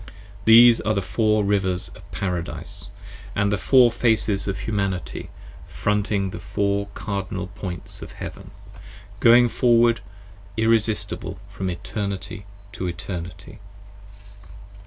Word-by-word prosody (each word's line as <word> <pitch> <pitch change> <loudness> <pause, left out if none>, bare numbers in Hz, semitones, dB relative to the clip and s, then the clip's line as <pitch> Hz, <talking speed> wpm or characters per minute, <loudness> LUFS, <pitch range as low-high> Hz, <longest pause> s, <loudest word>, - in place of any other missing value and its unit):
These 115 +1 +8
are 110 - 0
the 100 - +1
Four 110 +1 +1
Rivers 95 -2 0
of - - -16
Paradise, 90 -3 -5 0.5
And 100 0 +1
the - - +1
Four 125 0 +5
Faces 110 -4 +1
of 95 -1 -3
Humanity 100 -4 -3 0.4
fronting 105 -2 -1
the - - -7
Four 100 0 -1
Cardinal 100 -1 -4
Points 95 -5 -7
Of - - -9
Heaven, - - -8 0.7
going 120 +2 +7
forward, 120 -1 +3
forward 100 0 -21
irresistible 110 -1 0
from 95 -1 -3
Eternity 100 +2 -5 0.2
to 95 -3 -4
Eternity. 85 0 -7
100 Hz, 115 wpm, -23 LUFS, 95-110 Hz, 0.7 s, These